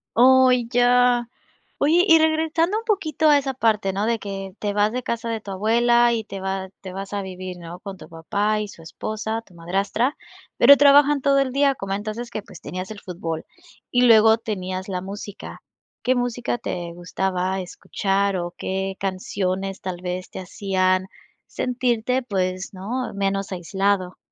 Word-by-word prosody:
Oh, 260 +1 +6
ya. 245 0 +3 0.5
Oye, 330 +5 +4
y 325 -1 +7
regresando 320 +4 +2
un 455 - -4
poquito 315 - +1
a 290 - +7
esa 270 -1 -3
parte, 215 -5 +1
¿no? 200 +3 -1
De 230 0 0
que 195 -2 -6
te 205 -1 -1
vas 210 +1 +2
de 250 +2 -2
casa 235 0 -3
de 225 -1 -2
tu 205 - -10
abuela, 235 +4 +3
y 225 -1 -1
te 195 -1 -7
va 190 0 -3
te 185 -1 -8
vas 195 +1 -6
a 200 - -1
vivir, 185 -1 -7
¿no? 170 +1 -9
Con 195 -2 -8
tu - - -12
papá 205 +6 -1
y 210 - -4
su 170 - -13
esposa, 215 +6 -4
tu 180 - -20
madrastra, 195 - -1 0.4
pero 280 +3 +8
trabajan 285 0 +6
todo 275 0 +3
el 265 -2 +1
día, 280 0 +3
comentas 205 +1 -4
es 240 0 -5
que, 210 - -5
pues, - - -13
tenías 185 +2 -6
el 210 - -8
fútbol. 165 -4 -5 0.4
Y 245 0 +3
luego 220 -2 +7
tenías 185 -4 -4
la 180 -1 -2
música, 200 +1 -8 0.4
¿qué 255 - +3
música 245 0 -1
te 170 -5 -5
gustaba 185 +1 -2
escuchar, 195 +2 -1
o 175 0 -4
qué 190 0 -3
canciones 190 0 -2
tal 185 -1 -4
vez 180 0 -4
te - - -8
hacían 185 0 0 0.4
sentirte, 250 0 0
pues, 185 -5 -2
no, 235 +7 -4
menos 195 0 -1
aislado? 190 +1 -1
205 Hz, 175 wpm, -23 LUFS, 190-245 Hz, 0.5 s, pero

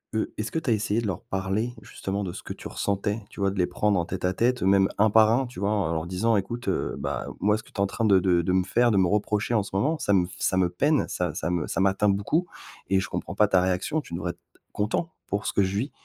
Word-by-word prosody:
eux, 110 - -1
est-ce 110 +1 -3
que 160 - 0
tu 155 -5 -4
as - - +5
essayé 105 +1 0
de 115 - -3
leur 95 -4 -3
parler 95 +5 -2
justement 100 +1 -4
de 90 - -5
ce - - -9
que - - -8
tu - - -9
ressentais? 100 +2 -2
Tu - - -13
vois? 100 0 +2
De 100 - -7
les 90 -2 +2
prendre 105 -1 +1
en 85 - -1
tête 90 +1 -4
à 90 - +1
tête, 125 +5 +1
même 95 0 +4
1 110 +2 +4
par 110 +1 +5
1 130 +3 +2
tu 125 - -10
vois? 100 +1 +1
En 100 -6 0
leur 80 0 -2
disant: 105 +6 +1
«Écoute, 120 +5 -4
heu, - - -1
bah - - -3
moi 105 +1 +2
ce 110 - -9
que - - -19
tu - - -27
es - - -6
en 100 - +3
train 115 +4 -3
de 100 -3 +6
de 90 -2 +3
de 85 - -1
me 95 0 +3
faire, 120 +5 +3
de 105 - +2
me 95 -2 +4
reprocher 105 +3 0
en 110 -3 +3
ce - - -10
moment, 145 +12 +1
ça - - 0
me 90 -3 +4
s 90 - -11
f - - -10
ça 95 - +1
me 90 -1 +3
peine, 145 - +2
ça 90 -3 -2
ça 80 - -2
me 85 -4 -1
ça - - -2
m'atteint 100 +2 +3
beaucoup 100 - +1 0.4
et 95 0 +3
je 95 - -3
comprends - - -4
pas 105 - +4
ta 95 -2 +4
réaction, 95 +12 0
tu 110 - -13
devrais 85 0 -2
être - - -19 0.2
c - - -26
content 110 +11 -1 0.2
pour 100 +1 -2
ce - - -1
que 100 - +3
je 95 +1 -1
vis 130 +8 -2
100 Hz, 310 wpm, -26 LUFS, 95-110 Hz, 0.4 s, de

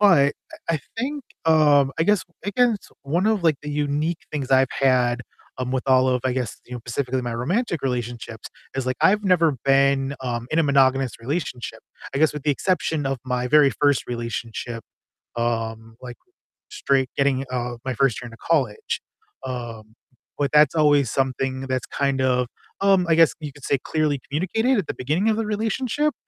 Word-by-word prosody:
But 160 -9 +5 0.3
I 165 - +2
I - - 0 0.2
think, 275 +2 -3 0.2
um 150 -3 +5
I 165 - +3
guess 205 0 +3 0.2
I 200 - -1
guess 245 -3 +4 0.3
one 170 +8 0
of, 215 -4 +2
like, 155 -4 +4
the 150 - -5
unique 150 +3 -1
things 140 -4 -3
I've 130 0 +5
had, 125 -2 +2 0.4
um, 130 0 -2
with 130 -1 -1
all 130 -1 +4
of 125 -1 +1
I 130 - +1
guess, 125 -4 -3
you 125 - -8
know- - - -4
specifically 130 +1 -2
my 120 -1 -3
romantic 170 - -1
relationships- 120 -3 -4 0.3
is, 135 - -1
like, 130 0 -1
I've 210 +2 +4
never 165 -6 +3
been, 135 0 +3
um, 120 -2 -3
in 155 - +1
a - - +5
monogamous 135 -3 +3
relationship 130 -1 -4 0.3
I - - 0
guess 155 +1 +4
with 150 -2 -6
the 150 - +3
exception 155 -1 0
of 135 -1 -1
my 125 -1 -1
very 145 0 +6
1st 145 -2 +3
relationship, 115 0 -5 0.5
um, 115 -1 -2
like, 125 -1 -8 0.5
straight 135 - +1
getting, 135 -1 +1
uh 120 -1 -2
my 130 - -1
1st 135 -4 +1
year 120 - -7
into 115 -1 -12
college, 135 -10 0 0.4
um, 115 -4 -6 0.4
but 140 -2 0
that's 150 +2 +5
always 145 -5 +4
something 130 0 -1
that's 130 -2 -1
kind 140 -1 0
of, 125 -1 +2 0.3
um 195 -2 +4
I 160 - +5
guess 165 -1 +5
you 150 -2 -5
could 145 - -16
say 140 - +2
clearly 155 -3 0
communicated 220 - +1
at 190 -7 -1
the - - -2
beginning 155 +11 0
of 220 - +2
the 225 - -1
relationship? 225 +7 0
140 Hz, 185 wpm, -23 LUFS, 125-160 Hz, 0.5 s, very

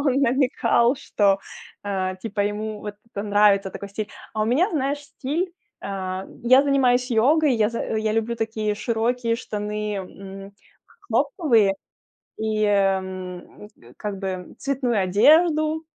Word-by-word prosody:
он 275 -1 +2
намекал, 250 -1 +3
что, 200 -7 +2 0.4
а, 190 -2 -2
типа, 205 +1 -4
ему 210 +1 -2
вот 210 0 -6 0.2
это 200 - -3
нравится, 205 -2 +3
такой 200 - -7
стиль. 205 +1 -5 0.3
А 215 - 0
у - - +2
меня, 285 - +2
знаешь, 285 -2 -1
стиль, 295 +5 -3 0.3
а 190 -1 -4 0.2
я 255 +3 +7
занимаюсь 255 -3 +2
йогой, 275 +5 +4
я 215 -2 +2
за 230 - -4 0.2
я 215 0 0
люблю 225 +1 -1
такие 220 -2 -1
широкие 230 +2 0
штаны, 210 -2 -4
м, 195 +1 -9 0.6
хлопковые, 230 - +2 0.6
и, 215 -1 0
м, 190 -2 -1
э, 120 +1 -17
как 205 -2 -4
бы, 195 - -4
м, 185 -1 -6
цветную 260 -5 0
одежду. 310 - +4
215 Hz, 140 wpm, -23 LUFS, 200-255 Hz, 0.6 s, я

